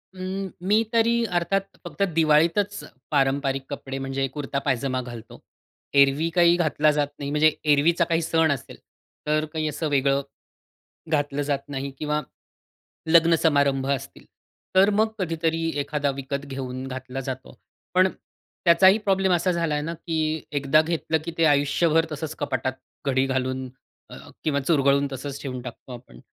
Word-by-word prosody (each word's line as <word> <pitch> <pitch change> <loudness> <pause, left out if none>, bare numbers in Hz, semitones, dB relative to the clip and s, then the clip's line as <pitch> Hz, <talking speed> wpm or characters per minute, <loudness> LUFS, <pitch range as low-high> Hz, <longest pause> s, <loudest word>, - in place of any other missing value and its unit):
अं, 190 +1 -4
मी 210 +5 +3
तरी 235 +1 +3
अर्थात 195 +3 0 0.2
फक्त 170 0 -8
दिवाळीतच 165 +6 +2 0.3
पारंपारिक 135 -1 +1
कपडे 135 -2 -5
म्हणजे 135 0 -2
कुर्ता 140 -2 -3
पायजमा 130 -1 0
घालतो. 120 -3 -10 0.6
एरवी 140 +4 +3
काही 170 -1 +5
घातला 155 -3 +2
जात 145 -1 0
नाही. 140 - -4
म्हणजे 155 +1 +4 0.2
एरवीचा 165 +4 +3
काही 165 0 0
सण 160 -1 +2
असेल, 135 -4 -5 0.5
तर 155 +1 +1
काही 155 -1 -1
असं 150 +2 -3
वेगळं 140 0 +2 0.9
घातलं 145 -2 0
जात 140 -1 -2
नाही 140 0 -4
किंवा 150 0 -1 0.9
लग्न 165 0 +5
समारंभ 140 -3 +2
असतील, 135 0 -4 0.5
तर 195 +2 +6
मग 215 +2 +2
कधीतरी, 165 -2 -1
एखादा 145 0 -1
विकत 140 +1 -4
घेऊन 130 -1 -5
घातला 130 0 -6
जातो. 130 0 -7 0.4
पण 185 +1 +5 0.6
त्याचाही 190 +4 +6
प्रॉब्लेम 195 -3 +1
असा 180 +1 +2
झालाय 165 -4 0
ना, 165 +3 -4
की 160 -2 -2
एकदा 145 +1 +3
घेतलं 160 0 -1
की 170 - -4
ते 165 - +4
आयुष्यभर 155 +3 +3
तसंच 155 +1 -5
कपाटात 130 -3 -1 0.3
घडी 135 0 +2
घालून 130 0 -2 0.4
अ, - - -9 0.3
किंवा 150 -3 +1
चुरगळून 140 -1 +2
तसंच 140 +1 -6
ठेवून 130 -2 -5
टाकतो 125 +1 -10
आपण. 115 - -12
150 Hz, 145 wpm, -24 LUFS, 135-165 Hz, 0.9 s, तर